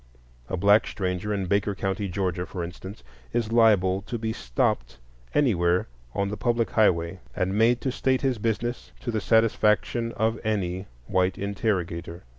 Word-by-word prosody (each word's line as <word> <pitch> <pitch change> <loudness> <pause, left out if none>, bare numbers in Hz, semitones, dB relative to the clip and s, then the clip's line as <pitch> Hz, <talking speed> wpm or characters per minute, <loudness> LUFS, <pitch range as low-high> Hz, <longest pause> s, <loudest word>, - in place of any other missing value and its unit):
A - - -2
black 100 +4 +5
stranger 90 +1 -2
in 100 -2 -1
Baker 100 +2 +1
County, 95 +1 -2
Georgia, 90 -1 -2
for 90 -3 -5
instance, 95 +3 -8 0.3
is 115 -2 0
liable 100 -5 +4
to 120 - -3
be 110 0 -2
stopped - - -1 0.4
anywhere 90 -11 +3 0.3
on 100 0 0
the 105 - -4
public 115 -2 0
highway 90 -4 +2 0.2
and 95 0 0
made 115 +3 +3
to 130 - -1
state 130 +1 +1
his 130 -5 0
business 115 +2 -2
to 120 - -3
the 110 -2 -1
satisfaction 115 +1 +2
of 110 +1 0
any 95 -3 -1 0.2
white 90 +5 +1
interrogator. 90 -4 -2
100 Hz, 155 wpm, -26 LUFS, 90-115 Hz, 0.4 s, black